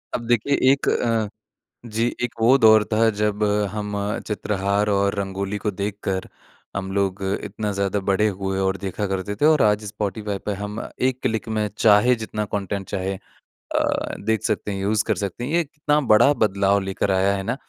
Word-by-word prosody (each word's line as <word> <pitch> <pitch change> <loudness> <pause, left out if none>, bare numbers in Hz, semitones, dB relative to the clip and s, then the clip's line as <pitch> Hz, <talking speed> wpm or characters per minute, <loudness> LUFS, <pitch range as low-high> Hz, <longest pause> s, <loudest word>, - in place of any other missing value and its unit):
अब 120 - -4
देखिए 120 +4 +2 0.2
एक 140 - 0
अ, 115 -2 +1 0.6
जी 115 0 -1 0.2
एक 120 - -2
वो 125 +4 +6
दौर 110 -3 +6
था 115 +1 +4
जब 105 0 0 0.3
हम 105 -1 -4 0.3
चित्रहार 100 -1 0
और 100 0 +1
रंगोली 100 +1 -3
को 105 +1 -2
देखकर, 100 -1 -3 0.5
हम 95 -1 -3
लोग 100 0 -1 0.2
इतना 105 0 -3
ज़्यादा 100 0 -1
बड़े 105 +2 +3
हुए 95 -1 -2
और 95 0 0
देखा 100 +2 -3
करते 95 +2 -3
थे 150 - +5
और 155 -2 +5
आज 105 0 +3
स्पॉटीफाई 105 0 -3
पे 105 - -1
हम 105 +2 -4 0.3
एक 130 0 -2
क्लिक 110 +1 -1
में 105 0 +1
चाहे 110 +3 +5
जितना 110 -2 -4
कॉन्टेंट 100 -1 -3
चाहे 95 -1 -2 0.4
अ, - - -2
देख 110 -2 0
सकते 105 - -1
हैं, 95 - -4
यूज़ 105 +2 +1
कर - - +1
सकते 100 +3 -4
हैं। 130 - -4
ये 170 0 +2
कितना 150 0 0
बड़ा 120 +7 +6
बदलाव 100 -1 +2
लेकर 95 +1 -2
आया 95 +1 +2
है 95 - -3
ना, 115 +4 -1
105 Hz, 185 wpm, -23 LUFS, 100-110 Hz, 0.6 s, वो